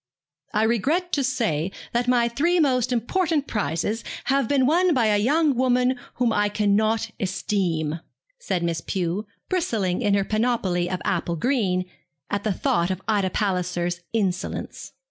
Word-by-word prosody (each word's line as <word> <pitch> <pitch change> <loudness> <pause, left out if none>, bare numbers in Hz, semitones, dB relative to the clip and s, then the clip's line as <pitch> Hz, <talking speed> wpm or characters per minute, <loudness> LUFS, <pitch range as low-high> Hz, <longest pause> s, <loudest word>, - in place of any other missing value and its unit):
'I 215 - +3
regret 290 - +1
to 280 - +2
say 215 - 0 0.2
that 240 +1 +1
my 245 -1 +3
three 330 +9 +1
most 255 -5 +2
important 295 - 0
prizes 205 - -2 0.2
have 275 -2 +1
been 270 -1 +3
won 345 +3 +3
by 240 -3 +3
a 210 -1 +3
young 295 +6 +3
woman 250 0 +2 0.2
whom 240 -3 +1
I 205 0 +2
cannot 215 +2 +1
esteem,' 180 -5 -1 0.4
said 185 - -2
Miss 165 -1 -1
Pew, 185 +4 -2 0.2
bristling 225 - 0
in 205 -4 +2
her 200 -1 +1
panoply 215 -6 0
of 185 0 -3
apple 170 -2 0
green, 190 - 0 0.5
at 200 0 -1
the 215 - +1
thought 170 -1 +1
of 190 0 -3
Ida 205 -4 +2
Palliser's 180 -3 -1
insolence. 195 -5 -3
215 Hz, 150 wpm, -24 LUFS, 185-255 Hz, 0.5 s, I